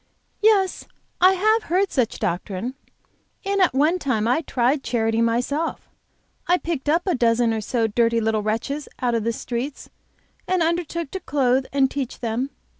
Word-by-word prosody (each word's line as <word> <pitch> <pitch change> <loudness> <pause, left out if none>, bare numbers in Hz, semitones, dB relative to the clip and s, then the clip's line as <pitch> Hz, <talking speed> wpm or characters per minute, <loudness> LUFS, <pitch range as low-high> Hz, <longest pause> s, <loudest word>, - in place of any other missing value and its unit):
"Yes, 410 -4 +2 0.3
I 370 +1 +7
have 435 +4 +2
heard 375 +3 +2
such 250 -5 0
doctrine, 195 +4 -3 0.7
and 395 0 +1
at 355 -8 +3
one 310 +6 +3
time 230 -8 0
I 250 +7 +2
tried 265 -1 0
charity 225 -1 0
myself. 245 +8 -1 0.6
I 355 - +4
picked 315 -5 -3
up 330 +3 +2
a 370 - +1
dozen 235 -2 +2
or 220 - -2
so 230 +2 -1
of 220 -2 -1
dirty 230 0 +3
little 220 -1 0
wretches 230 +8 -3
out 245 -1 0
of 230 -2 0
the 230 - 0
streets, 245 +4 -5 0.6
and 365 -2 +2
undertook 335 -2 -2
to 380 - -4
clothe 265 -5 +1
and 270 -1 +2
teach 275 -4 -4
them. 240 +3 -2
265 Hz, 170 wpm, -23 LUFS, 230-335 Hz, 0.7 s, I